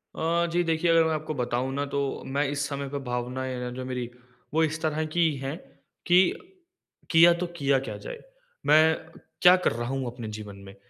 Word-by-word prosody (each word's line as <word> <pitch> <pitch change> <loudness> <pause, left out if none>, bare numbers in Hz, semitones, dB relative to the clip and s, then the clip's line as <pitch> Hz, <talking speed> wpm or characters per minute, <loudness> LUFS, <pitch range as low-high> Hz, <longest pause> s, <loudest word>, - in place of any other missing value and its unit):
अ, 170 +1 +1
जी 175 +1 +2
देखिए 165 0 0
अगर 165 0 +5
मैं 160 0 +1
आपको 155 0 -3
बताऊँ 125 0 -2
ना 140 +1 -1
तो 140 - +1 0.3
मैं 140 +2 0
इस 145 0 -2
समय 140 -1 -4
पे 140 +1 -4
भावनाएँ 125 +1 -3
है 125 - -4
ना 125 0 -4
जो 130 +1 -6
मेरी, 125 -2 -4 0.4
वो 160 +1 +3
इस 155 0 -1
तरह 155 0 -1
की 170 -2 +3
है 135 +2 -4 0.5
कि 180 +1 +5 0.8
किया 170 +1 +8
तो 175 +1 -3
किया 140 -2 +2
क्या 125 -5 -6
जाए? 105 - -8 0.5
मैं 160 +1 +5 0.5
क्या 180 +1 +8
कर 180 - +1
रहा 120 +1 -4
हूँ 135 -1 -2
अपने 120 -1 -6
जीवन 105 -2 -7
में? 95 0 -12
140 Hz, 205 wpm, -26 LUFS, 125-160 Hz, 0.8 s, किया